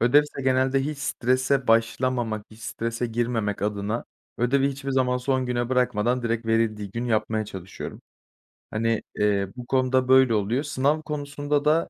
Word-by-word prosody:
Ödevse 140 +3 +3
genelde 130 +1 +2
hiç 150 0 -4
strese 130 0 +1
başlamamak, 115 -1 +1
hiç 110 +1 -15
strese 115 +2 -3
girmemek 115 -3 -1
adına 105 +2 -2 0.3
ödevi 135 +3 +2
hiçbir 135 0 -5
zaman 130 -1 +2
son 130 0 0
güne 120 -1 -1
bırakmadan 125 -1 +1
direkt 115 -1 -1
verildiği 110 -3 0
gün 115 +4 -3
yapmaya 110 -2 0
çalışıyorum. 95 -2 -8 0.7
Hani, 115 +1 0
eee, 100 -1 +1
bu 125 -1 -7
konuda 130 0 +2
böyle 130 -2 +6
oluyor. 110 +6 +1
Sınav 145 +1 +1
konusunda 145 -1 -2
da 160 +2 +3
125 Hz, 145 wpm, -25 LUFS, 115-135 Hz, 0.7 s, böyle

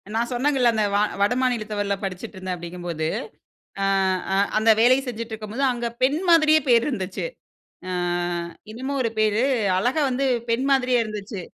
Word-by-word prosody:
நான் 235 +2 0
சொன்னேன்ங்கல்ல 250 -1 +2
அந்த, 215 -1 +1
வ - - +4 0.2
வட 205 +5 +3
மாநிலத்தவர்ல 215 -5 -1
படிச்சிட்டு 195 +2 -5
இருந்தேன் 185 -1 -4
அப்டிங்கும்போது, 170 -2 -4 0.8
அ, - - +2 0.7
அந்த 220 +1 +3
வேலைய 255 +3 +5
செஞ்சிட்டு 230 -1 -5
இருக்கும் 215 -1 -7
போது 275 - -1
அங்க 240 -1 -3 0.2
பெண் 285 +5 +2
மாதிரியே 310 -2 +6
பேரு 235 -1 +5
இருந்துச்சி. 190 - -4 0.6
அ, - - -3 0.8
என்னமோ 260 +4 -4
ஒரு 230 - -1
பேரு, 215 +2 +2 0.4
அழகா 255 +9 +1
வந்து 270 +2 0 0.2
பெண் 255 +4 +1
மாதிரியே 255 -2 +3
இருந்துச்சு. 210 -2 -6
230 Hz, 150 wpm, -23 LUFS, 205-255 Hz, 0.8 s, மாதிரியே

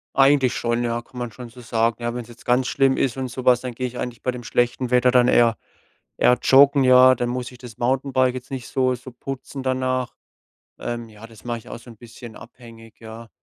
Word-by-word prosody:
Eigentlich 135 -2 +4
schon, 120 0 -1
ja, 120 0 -2
kann 125 - -17
man 120 -1 -4
schon 120 +2 -10
so 125 +1 -14
sagen. 115 0 -1
Ja, 120 0 -2
wenn's 120 -2 -6
jetzt 120 -1 -16
ganz 125 +1 +2
schlimm 135 -1 +2
ist 130 -4 0
und 130 -1 -4
so 125 +2 -7
was, 125 -1 +4
dann 125 -1 -5
gehe 125 +2 -3
ich 125 0 -9
eigentlich 120 -2 -6
bei 125 - -1
dem 125 -1 -9
schlechten 120 +2 -1
Wetter 125 0 +4
dann 125 0 +4
eher 115 -1 +3 0.6
eher 125 - +3
joggen, 140 +1 +5
ja. 130 0 +7
Dann 120 0 -2
muss 125 +1 -4
ich 125 - -14
das 120 -2 -12
Mountainbike 130 0 +1
jetzt 130 +1 -8
nicht 130 -2 -6
so 130 -1 +1
so 125 +1 -12
putzen 135 +2 -7
danach. 130 -1 -2 0.6
Ähm 120 -1 -6
ja, 110 +1 -13
das 115 0 -17
mach 120 - -2
ich 115 - -14
auch - - -8
so 120 - -16
'n 115 - -14
bisschen 120 -1 -12
abhängig, 115 -2 -15
ja? 115 +1 -11
125 Hz, 230 wpm, -22 LUFS, 120-130 Hz, 0.6 s, ja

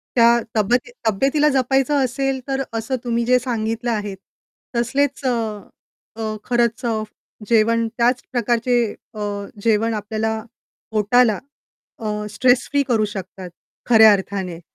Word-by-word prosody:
त्या 235 0 +6 0.2
तब्येती 240 +4 +1 0.2
तब्येतीला 275 +8 +2
जपायचं 270 +1 +2
असेल, 270 +1 -1
तर 270 0 -1
असं 225 +3 -2
तुम्ही 235 -1 0
जे 250 +1 +4
सांगितलं 230 -1 -2
आहे 205 -3 -3 0.6
तसलेच 270 +4 0
अ, 255 - +3 0.9
अ, 220 -1 -3
खरंच 240 0 0
अ, 220 -2 0 0.5
जेवण 230 0 +3
त्याच 245 +1 +2
प्रकारचे 240 0 +1 0.3
अ, 215 - -9 0.4
जेवण 225 0 +2
आपल्याला 220 +1 -2 0.5
पोटाला 215 0 +3 0.6
अ, 225 - -7 0.2
स्ट्रेस 245 +4 +2
फ्री 285 0 +2
करू 225 -3 +2
शकतात 190 -2 -7 0.4
खऱ्या 220 -2 +8
अर्थाने. 190 -3 -3
235 Hz, 120 wpm, -21 LUFS, 215-250 Hz, 0.9 s, खऱ्या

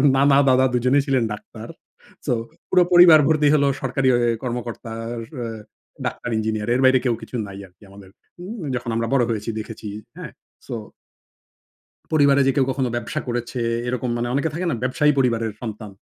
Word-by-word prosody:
নানা, 140 0 +4
দাদা 130 0 +4
২ 120 - +1
জনেই 135 +2 +4
ছিলেন 130 -3 +2
ডাক্তার। 105 - -10 0.6
সো, - - +1 0.4
পুরো 180 -1 +5
পরিবার 175 -3 +9
ভর্তি 155 -2 +3
হলো 140 -1 +3
সরকারি 135 0 0
অ - - +3 0.3
কর্মকর্তা, 120 -2 -5 0.2
অ - - -5 0.2
অ - - -3 0.6
ডাক্তার, 120 - -4
ইঞ্জিনিয়ার, 110 -1 -2
এর 130 - +1
বাইরে 130 0 +5
কেউ 120 -2 +2
কিছু - - -9
নাই 100 0 -9
আরকি 90 +3 -24
আমাদের 100 -1 -14 0.3
হুম, 195 +6 -7 0.2
যখন 120 -1 -4
আমরা 115 0 -1
বড় 130 -3 +4
হয়েছি 110 0 -3
দেখেছি। 110 0 -8 0.3
হ্যাঁ, - - -8 0.4
সো - - -5 1.4
পরিবারে 140 -2 +4
যে 135 - +3
কেউ 135 - +4
কখনো 130 -2 -1
ব্যবসা 120 +6 -3
করেছে 120 +1 -3 0.3
এরকম 125 0 -2
মানে 120 +1 -2
অনেকে 145 +4 +1
থাকে 180 +2 -3
না - - -1
ব্যবসায়ী 150 +4 +2
পরিবারের 115 -4 +1
সন্তান। 110 -2 -6
125 Hz, 175 wpm, -22 LUFS, 115-140 Hz, 1.4 s, পরিবার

